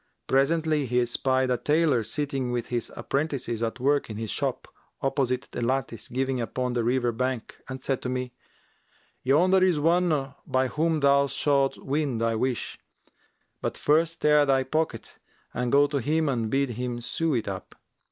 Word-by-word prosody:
Presently 155 +1 +2
he 125 +1 +2
espied 130 +2 +1
a 125 - +2
tailor 150 -4 +2
sitting 135 +2 -2
with 120 -1 -3
his 120 -1 -2
apprentices 135 -6 -2
at 115 +2 -2
work 140 +1 +1
in 105 - -6
his 110 -2 -3
shop, - - -2 0.3
opposite 135 -1 -1
the - - -4
lattice 120 -1 -1
giving 130 0 -1
upon 125 +2 -2
the 120 -1 0
river 120 0 +1
bank 125 0 -3
and 130 0 -5
said 135 0 -2
to 125 - -3
me, 125 -1 -3 0.9
'Yonder 180 +8 +4
is 180 -5 +3
one 160 -4 +2
by 130 0 +1
whom 160 +1 0
thou 140 0 +4
shalt 140 -1 +1
win 140 -3 -1
thy 115 0 +1
wish; 125 +2 -2 0.8
but - - -2
first 165 +2 +1
tear 150 -1 +5
thy 135 -2 +2
pocket 145 -4 -3 0.3
and 125 -1 -1
go 145 +1 +6
to 145 0 -2
him 155 +5 +1
and 115 -4 -1
bid 135 +1 +1
him 120 +1 -3
sew 160 +5 -1
it 115 - -1
up. 95 -2 -6
135 Hz, 170 wpm, -26 LUFS, 125-145 Hz, 0.9 s, go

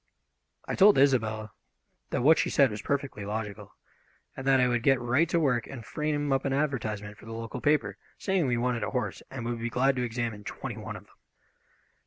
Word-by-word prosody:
I - - -2
told 205 +1 +6
Isobel 110 -6 +2 0.6
that - - -1
what 160 +4 +6
she - - +1
said 140 -4 +4
was 105 0 -5
perfectly 140 -6 -2
logical, 105 0 -5 0.6
and 130 - -6
that 135 -1 +5
I 125 - +4
would 120 -1 +1
get 135 +1 +4
right 130 +7 +2
to 170 - +2
work 125 -7 +1
and 120 -5 -8
frame 145 -1 -1
up 135 - +1
an 135 - 0
advertisement 110 -8 -2
for - - -14
the 115 - -6
local 115 0 -6
paper, 150 0 +1 0.2
saying 190 -6 0
we 120 -1 +1
wanted 120 -1 0
a - - -1
horse 125 -2 -3
and 130 -3 -6
would 120 0 -2
be 120 +1 -2
glad 130 +3 +2
to 125 - 0
examine 115 -3 -3
twenty - - -6
one - - -6
of - - -9
them. - - -25
125 Hz, 210 wpm, -28 LUFS, 115-140 Hz, 0.6 s, told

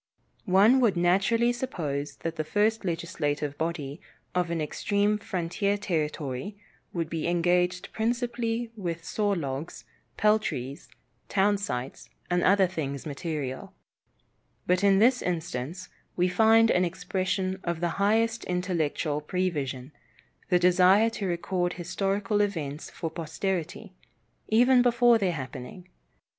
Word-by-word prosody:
One 205 +8 +6
would 225 -8 +3
naturally 195 +7 +3
suppose 155 - -3
that 165 0 -2
the 155 - -2
first 210 +8 +1
legislative 155 -4 -2
body 160 -2 -4 0.3
of 180 -1 0
an 170 -1 -1
extreme 205 +7 0
frontier 200 +1 -1
territory 155 -2 -3 0.3
would 165 -2 -2
be 165 0 -3
engaged 180 +1 +1
principally 235 0 -1
with 170 -5 -4
saw 210 -1 0
logs, 145 -2 -5 0.3
peltries, 185 - 0 0.4
town 205 +1 +2
sites, 130 -8 -5 0.2
and 175 0 +2
other 195 +1 +5
things 145 -7 -4
material; 145 -3 -5 0.9
but 180 +2 +1
in 195 -1 +5
this 245 +5 +4
instance 175 0 -4 0.3
we 180 0 +2
find 225 +4 +5
an 180 - +3
expression 185 +2 -2
of 170 -2 -2
the 175 +3 -2
highest 225 +3 +2
intellectual 170 -4 -1
prevision, 150 -6 -2 0.6
the 180 - +5
desire 185 +5 +5
to 205 -3 -3
record 175 0 -1
historical 195 +4 -1
events 155 -7 -3
for 165 -2 -5
posterity, 175 +4 -4 0.6
even 245 +3 +5
before 240 -1 +4
their 190 -4 +1
happening. 135 +5 -7
180 Hz, 120 wpm, -27 LUFS, 160-205 Hz, 0.9 s, One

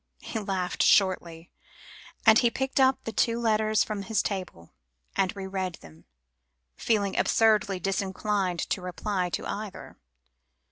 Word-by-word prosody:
He 225 - -4
laughed 190 -3 -2
shortly, 175 -4 +2 0.7
as 220 -1 +7
he 240 - +3
picked 265 +3 -2
up 265 0 +3
the 225 - -4
two 230 +1 +1
letters 215 -2 +2
from 210 -2 -4
his 220 +2 0
table, 185 - -5 0.4
and 190 0 0
re 195 -1 -6
read 190 -2 -3
them, 80 - -17 0.7
feeling 205 -4 0
absurdly 210 -4 +2
disinclined 195 -1 -1
to 190 - 0
reply 180 0 -2
to - - -4
either. 210 -1 -7
200 Hz, 135 wpm, -27 LUFS, 185-220 Hz, 0.7 s, as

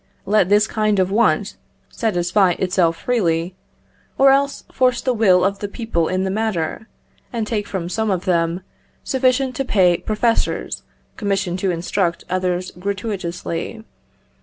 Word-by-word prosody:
_, - - -42 0.2
let 200 -2 +3
this 210 +1 +5
kind 215 -2 0
of 185 0 +1
want 230 +4 +1 0.3
satisfy 185 -3 +2
itself 180 -2 +1
freely; 175 -7 0 0.6
or 270 0 +6
else 280 +1 +1
force 250 -2 +2
the 255 - 0
will 190 -6 +4
of 200 0 0
the 205 - -3
people 200 -6 -2
in 185 0 0
the 190 - -1
matter, 215 -2 -2 0.4
and 230 -3 -2
take 210 -2 -2
from 185 -3 -3
some 220 +4 -1
of 185 -2 -1
them 170 0 +1 0.4
sufficient 260 0 +1
to 270 - -1
pay 185 -8 +3
professors 225 +4 -1 0.4
commissioned 195 -3 -1
to 190 - 0
instruct 175 0 -1
others 185 0 -1
gratuitously. 195 0 -4
195 Hz, 145 wpm, -20 LUFS, 180-220 Hz, 0.6 s, or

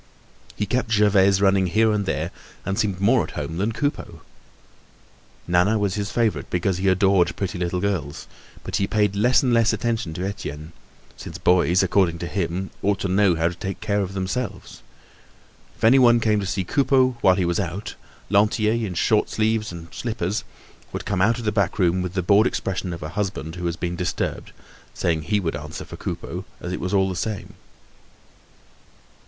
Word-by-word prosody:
He 105 - -1
kept 125 +3 -1
Gervaise 100 -2 +4
running 95 -1 +3
here 110 +5 +3
and 105 -2 -1
there - - -2 0.3
and 95 +1 -1
seemed 100 -3 0
more 115 +5 +3
at - - -9
home 75 +3 -4
than 100 +5 0
Coupeau. 145 +6 -3 1.3
Nana 90 +5 +3
was 100 -3 0
his 100 0 -2
favorite 115 -1 0
because 90 +1 0
he 95 - 0
adored 95 -2 +3
pretty 95 -1 -3
little 90 0 -1
girls, 90 -7 -2 0.4
but - - -2
he 95 - 0
paid 105 -2 +1
less 120 +7 +3
and 125 -2 +2
less 115 -1 +4
attention 115 -9 -2
to 90 +2 -3
Etienne, 75 -5 -6 0.5
since - - -8
boys, 90 +1 +3
according 90 -3 +2
to 85 - -5
him, 90 +1 -3
ought 100 0 +1
to - - 0
know 95 -1 +3
how 80 +1 +1
to - - -7
take 95 +2 -5
care 105 -1 0
of 95 0 -4
themselves. 100 +7 -4 1.0
If - - -17
anyone 120 0 +6
came 110 -2 +2
to 100 - -3
see 95 0 -1
Coupeau 130 +3 +2
while 95 - +5
he 95 -2 0
was 85 +2 0
out, 95 +2 -4 0.4
Lantier, 105 +1 +3
in 110 -6 -2
shirt 105 +4 +2
sleeves 110 -1 0
and 85 -1 -9
slippers, 110 -2 -2 0.5
would - - -5
come 95 -3 -1
out 115 +4 +3
of 120 - -6
the 105 - +2
back 100 -3 0
room 90 -1 +2
with 90 0 -4
the 90 - 0
bored 100 +4 +5
expression 95 -1 -3
of 85 -1 -6
a 75 - -5
husband 95 -3 -3
who 90 0 -4
has 85 - -2
been 90 -2 -3
disturbed, 90 -1 -3 0.4
saying 80 -2 0
he 105 +8 0
would 85 -6 -2
answer 75 +2 -7
for - - -9
Coupeau - - -5 0.2
as 90 - -5
it - - -3
was 90 - -2
all 95 -1 +3
the 95 - -3
same. 105 +2 -4
95 Hz, 190 wpm, -23 LUFS, 90-105 Hz, 1.3 s, anyone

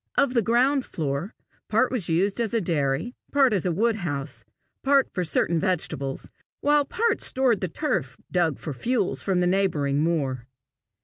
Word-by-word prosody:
Of 275 -3 +3
the 235 - +3
ground 255 +5 +2
floor, 155 - -4 0.3
part 225 +4 +2
was 225 -10 -1
used 195 +7 +1
as 230 0 -1
a - - +3
dairy, 160 - -1 0.2
part 270 -4 +4
as 190 -3 0
a - - +1
woodhouse, 170 -8 -1 0.4
part 275 -1 +3
for 180 - -1
certain 170 0 +1
vegetables, 155 -7 -2 0.3
while 290 0 +3
part 460 +10 0
stored 255 -5 +1
the 185 - 0
turf 130 -4 -2
dug 170 -5 +1
for 150 - -5
fuel 215 - 0
from 185 -2 0
the - - +2
neighbouring 165 -7 +1
moor. 135 -7 -1
185 Hz, 165 wpm, -25 LUFS, 155-240 Hz, 0.4 s, part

